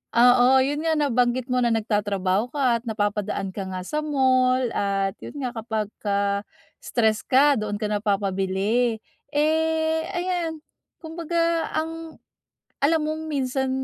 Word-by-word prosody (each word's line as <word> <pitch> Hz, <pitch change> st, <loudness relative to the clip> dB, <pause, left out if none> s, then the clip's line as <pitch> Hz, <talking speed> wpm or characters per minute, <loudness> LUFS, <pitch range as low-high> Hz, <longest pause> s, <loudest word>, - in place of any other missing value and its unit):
oo, 245 Hz, +1 st, +6 dB, 0.2 s
'yon 290 Hz, +2 st, -1 dB
nga 320 Hz, -, +2 dB
nabanggit 250 Hz, -3 st, +1 dB
mo 250 Hz, -, +2 dB
na 240 Hz, -, +2 dB
nagtatrabaho 205 Hz, -1 st, 0 dB
ka 250 Hz, -3 st, +1 dB
at -, -, -21 dB
napapadaan 205 Hz, -2 st, -2 dB
ka 195 Hz, -1 st, -5 dB
nga 185 Hz, -1 st, -5 dB
sa 300 Hz, +11 st, -2 dB
mall. 260 Hz, -3 st, +2 dB
At 195 Hz, 0 st, -1 dB
'yon -, -, -10 dB
nga 250 Hz, -, -2 dB
kapagka, 205 Hz, -3 st, -2 dB, 0.3 s
stress 220 Hz, -2 st, +1 dB
ka 275 Hz, -1 st, +3 dB
doon 210 Hz, -1 st, -3 dB
ka 210 Hz, 0 st, -3 dB
napapabili. 205 Hz, +3 st, 0 dB, 0.3 s
Eh 320 Hz, +1 st, +1 dB, 0.2 s
ayan, 345 Hz, -3 st, -2 dB, 0.4 s
kumbaga 335 Hz, 0 st, -1 dB
ang, 325 Hz, 0 st, -4 dB, 0.7 s
alam 320 Hz, +3 st, +4 dB
mong 310 Hz, +1 st, -3 dB
minsan, 265 Hz, -2 st, -1 dB
245 Hz, 130 wpm, -24 LUFS, 205-300 Hz, 0.7 s, oo